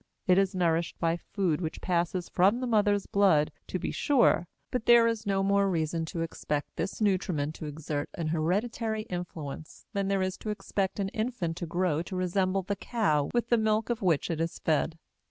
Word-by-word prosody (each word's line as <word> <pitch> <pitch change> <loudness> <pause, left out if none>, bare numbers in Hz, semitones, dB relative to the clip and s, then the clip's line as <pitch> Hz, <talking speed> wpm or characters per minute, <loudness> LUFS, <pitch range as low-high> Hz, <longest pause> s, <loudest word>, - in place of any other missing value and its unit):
It 185 +1 +5
is 195 -1 +1
nourished 170 -2 +1
by 165 0 +1
food 175 -2 -1
which 160 -2 -4
passes 175 0 -1
from 195 +6 +3
the 255 - -2
mother's 205 -4 +2
blood, 185 -7 +3 0.2
to - - -2
be - - -3
sure, 240 -11 +3 0.2
but 250 -3 -2
there 235 -1 +8
is 230 -2 -1
no 195 -1 +1
more 200 0 +3
reason 165 -1 -1
to 165 +1 -4
expect 150 -3 -3
this 195 +5 -3
nutriment 180 -7 +1
to 155 - -6
exert 150 -1 -4
an 165 -3 -2
hereditary 215 +7 -1
influence 160 -4 -6
than 200 -1 0
there 195 -1 +1
is 185 0 -2
to 215 - -5
expect 200 -2 -2
an 195 -1 0
infant 215 -7 -2
to 175 - -4
grow 175 -2 0
to 180 +2 -6
resemble 185 +1 0
the 200 +3 -2
cow 190 -10 0
with 240 0 0
the 235 - +4
milk 220 +1 +1
of 235 - -2
which 170 -4 +1
it 165 -1 -2
is 165 0 -2
fed. 160 +1 0
185 Hz, 195 wpm, -29 LUFS, 165-205 Hz, 0.2 s, there